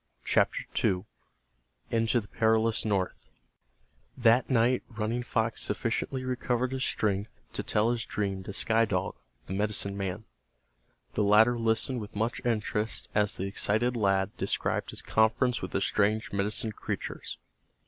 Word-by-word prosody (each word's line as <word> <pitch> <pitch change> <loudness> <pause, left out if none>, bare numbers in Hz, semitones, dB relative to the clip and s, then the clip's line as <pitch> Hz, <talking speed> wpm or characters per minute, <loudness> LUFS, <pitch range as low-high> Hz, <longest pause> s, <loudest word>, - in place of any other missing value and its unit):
CHAPTER - - +2 0.2
II—INTO 110 - -3
THE 100 - -13
PERILOUS 110 0 +2
NORTH 100 -4 -1 0.9
That 120 0 +4
night 125 0 +3
Running 115 +2 -2
Fox 115 -2 0
sufficiently 120 +4 -1
recovered 125 0 -1
his 130 0 -2
strength 105 -3 -1
to - - -2
tell 110 +3 +1
his 120 -2 -1
dream 100 -2 -2
to - - -5
Sky 115 +3 +2
Dog, 95 -1 -1 0.3
the 95 - -5
medicine 100 0 0
man. 100 +2 -4 0.9
The - - 0
latter 110 +4 +5
listened 115 +3 +1
with 105 +1 -9
much 115 +4 -1
interest 110 -2 -1
as 105 -1 +2
the 95 - -3
excited 110 +5 +1
lad 100 -2 +1
described - - -1
his - - -4
conference 115 +3 +2
with - - -4
the - - -1
strange 105 +2 +1
medicine 105 +2 0
creatures. - - -5
110 Hz, 140 wpm, -29 LUFS, 100-115 Hz, 0.9 s, latter